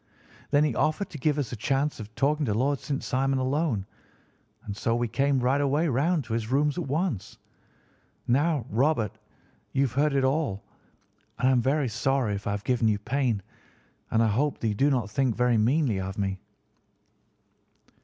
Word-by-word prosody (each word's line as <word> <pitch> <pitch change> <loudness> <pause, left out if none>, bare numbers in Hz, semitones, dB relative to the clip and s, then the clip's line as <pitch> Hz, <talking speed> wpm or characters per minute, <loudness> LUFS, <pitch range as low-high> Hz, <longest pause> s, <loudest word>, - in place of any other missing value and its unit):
Then 145 0 +4
he 150 -4 +1
offered 155 - 0
to 150 - -7
give 150 +2 +1
us 135 -7 -2
a - - -3
chance 135 +6 -1
of 110 +1 -9
talking 150 +5 +1
to 105 - 0
Lord 135 +4 +1
St. 140 -2 -3
Simon 135 +1 0
alone, 130 - 0 0.8
and 100 - -5
so 115 +2 0
we 120 0 0
came 135 +3 +1
right 130 +3 +2
away 145 +4 +2
round 150 +5 +1
to 110 - -6
his 115 -1 -2
rooms 145 +2 +2
at 165 - -4
once. 145 - -2 0.9
Now, 145 +1 +2
Robert, 120 -3 +1 0.5
you 135 - +2
have 130 - 0
heard 140 +3 +1
it 135 - +2
all, 130 -7 0 0.7
and 125 +2 +2
I - - +4
am 125 -2 +3
very 135 +3 +1
sorry 125 -1 0
if 100 0 -5
I - - +1
have 100 0 -4
given 120 -1 +1
you 105 -1 +2
pain, 115 -1 -1 0.7
and 115 +1 +3
I - - +3
hope 135 +7 0
that 115 - 0
you - - 0
do 135 +8 +2
not 120 -7 0
think 130 0 +1
very 125 -1 +2
meanly 120 -2 +2
of 95 +1 -5
me." 95 -2 -2
130 Hz, 190 wpm, -27 LUFS, 110-145 Hz, 0.9 s, Then